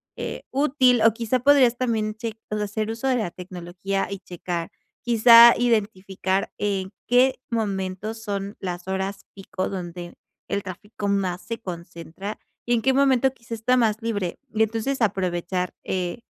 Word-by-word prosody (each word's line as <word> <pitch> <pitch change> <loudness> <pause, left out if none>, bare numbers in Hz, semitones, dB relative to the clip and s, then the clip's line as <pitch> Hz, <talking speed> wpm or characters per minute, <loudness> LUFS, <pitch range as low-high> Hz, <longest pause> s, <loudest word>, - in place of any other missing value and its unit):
eh, - - -5
útil, 260 -4 +3
o 225 0 +6
quizá 230 +3 -1
podrías 260 -2 +5
también 225 -4 -1
cheq 225 0 -6
pues, 210 0 -2
hacer 210 +1 -2
uso 230 +4 -3
de 260 - +3
la 215 -8 -1
tecnología 180 +2 -4
y 200 - -4
checar, 175 -2 -5 0.3
quizá 235 0 +8
identificar 200 -4 0
en 195 -2 -1 0.2
qué 250 +2 +4
momento 200 -2 -2
son 205 -3 -5
las 180 -1 -5
horas 190 +1 -3
pico 190 -1 -4
donde 175 -2 -6 0.3
el 200 - -1
tráfico 205 +3 -6
más 190 -2 0
se 230 0 -5
concentra 175 +2 -7 0.3
y 240 - +1
en 225 - -1
qué 265 - +3
momento 265 -1 +3
quizá 230 -2 -8
está 230 +3 +1
más 225 -4 +2
libre, 205 -6 -2 0.2
y 220 - 0
entonces 225 +5 0
aprovechar, 180 -3 -1
eh, 180 +3 -2
210 Hz, 155 wpm, -24 LUFS, 185-235 Hz, 0.3 s, quizá